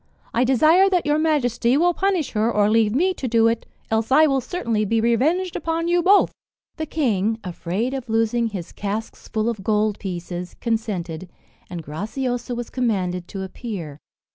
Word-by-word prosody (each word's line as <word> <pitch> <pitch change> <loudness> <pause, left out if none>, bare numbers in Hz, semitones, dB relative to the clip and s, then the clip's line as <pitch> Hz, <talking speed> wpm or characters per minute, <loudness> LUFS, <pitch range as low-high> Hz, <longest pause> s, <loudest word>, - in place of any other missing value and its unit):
I 240 - +3
desire 310 +9 +5
that 360 -3 +1
your 295 +1 +2
majesty 255 -5 +2
will 350 +3 +3
punish 380 -5 0
her, 220 +1 +1
or 210 -1 +2
leave 220 0 +3
me 370 +6 +2
to 270 - -4
do 230 -1 +4
it 230 0 -1 0.2
else 225 +2 0
I 310 +4 +7
will 275 -3 +2
certainly 230 - -1
be 225 +2 +1
revenged 300 +11 +1
upon 330 +1 -1
you 350 0 +3
both." 395 +4 +5 0.5
The 315 -1 -3
king, 225 -8 0
afraid 185 +7 -3
of 260 -3 -5
losing 225 +1 +1
his 190 -6 -6
casks 210 +2 -5
full 220 0 -1
of 220 -4 -2
gold 210 0 +1
pieces, 175 -1 -5
consented, 185 -7 -3 0.4
and 175 -2 -6
Graciosa 245 - -3
was 240 -1 -5
commanded 185 -8 -1
to 195 -2 -5
appear. 185 - -6
230 Hz, 170 wpm, -22 LUFS, 205-280 Hz, 0.5 s, I